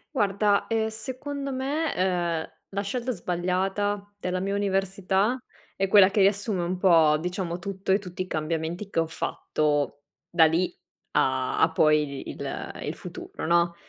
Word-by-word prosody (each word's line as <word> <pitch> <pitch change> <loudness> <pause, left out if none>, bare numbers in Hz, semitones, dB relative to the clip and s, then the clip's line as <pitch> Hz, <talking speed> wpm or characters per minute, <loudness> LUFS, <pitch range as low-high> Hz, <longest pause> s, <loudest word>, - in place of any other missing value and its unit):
Guarda, 205 -2 +2
ehm, 220 -1 +1
secondo 265 +5 -5
me, 280 +5 -1
uhm, 175 -3 0 0.2
la 200 - 0
scelta 245 +5 -2
sbagliata 195 +3 -1
della 180 0 -2
mia 195 +1 -1
università 195 +3 +1 0.4
è 195 0 +1
quella 195 -1 +7
che 205 +1 0
riassume 200 -1 +2
un 180 +2 -2
po', 165 -5 +5
diciamo, 180 +1 -3
tutto 190 0 -1
e - - +5
tutti 185 -2 -7
i - - -12
cambiamenti 165 +4 -3
che 170 - 0
ho 165 - +1
fatto 145 -2 -1 0.3
da 170 -2 +6
lì 175 +3 0 0.3
a 130 -1 +1
a 160 - +5
poi 150 -3 +2
il - - -5
il - - -3
futuro, - - -8
no, 170 +1 +3
185 Hz, 150 wpm, -26 LUFS, 170-205 Hz, 0.4 s, quella